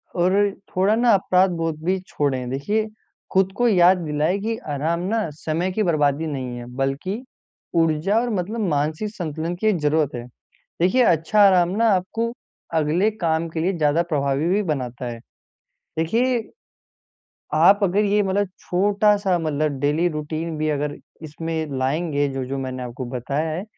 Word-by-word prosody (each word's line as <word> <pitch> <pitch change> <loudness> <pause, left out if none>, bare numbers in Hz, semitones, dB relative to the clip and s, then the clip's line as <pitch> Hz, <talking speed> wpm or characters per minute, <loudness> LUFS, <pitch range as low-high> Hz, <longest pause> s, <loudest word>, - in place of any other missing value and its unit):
और 180 +2 +2 0.4
थोड़ा-ना 220 +6 +3
अपराध 190 -1 +3
बोध 165 -2 -2
भी 190 +1 +1
छोड़ें। 130 -4 -1
देखिए 205 +12 -1 0.5
खुद 190 0 +3
को 245 - +3
याद 185 -3 +5
दिलाएँ 155 +2 0
कि 225 +3 -2 0.2
आराम 160 +4 -1
ना 225 -6 0
समय 170 +4 -1
की 215 +3 0
बर्बादी 155 -2 +1
नहीं 130 -4 -4
है, 120 - -7
बल्कि 145 - -2 0.5
ऊर्जा 165 +6 +2
और 245 - -1
मतलब 205 +5 -2
मानसिक 155 +8 -1
संतुलन 165 -1 -3
की 215 +5 -1
एक 210 -4 +3
जरूरत 150 -1 +1
है। 120 0 -6 0.6
देखिए 235 +9 +4
अच्छा 175 +2 +3
आराम 180 -2 +4
ना 230 0 +4
आपको 225 +5 -1 0.4
अगले 160 +7 +2
काम 165 -5 -1
के 160 - -4
लिए 190 +3 +1
ज़्यादा 155 +2 +2
प्रभावी 145 -2 0
भी 205 +3 +2
बनाता 130 - -3
है। 120 - -5 0.8
देखिए, 230 +8 +1 1.1
आप 200 +1 +6
अगर 200 +2 +2
ये 205 +1 +3
मतलब 195 +1 0
छोटा-सा 200 0 +2
मतलब 155 -3 -1
डेली 150 +5 +2
रूटीन 155 +1 -4
भी 155 0 0
अगर 145 0 -1 0.3
इसमें 160 +1 -4
लाएँगे, 145 +2 0
जो-जो 135 0 -4
मैंने 130 -1 -4
आपको 125 +1 -6
बताया 140 +6 -2
है, 170 +5 -3
165 Hz, 155 wpm, -22 LUFS, 150-195 Hz, 1.1 s, आप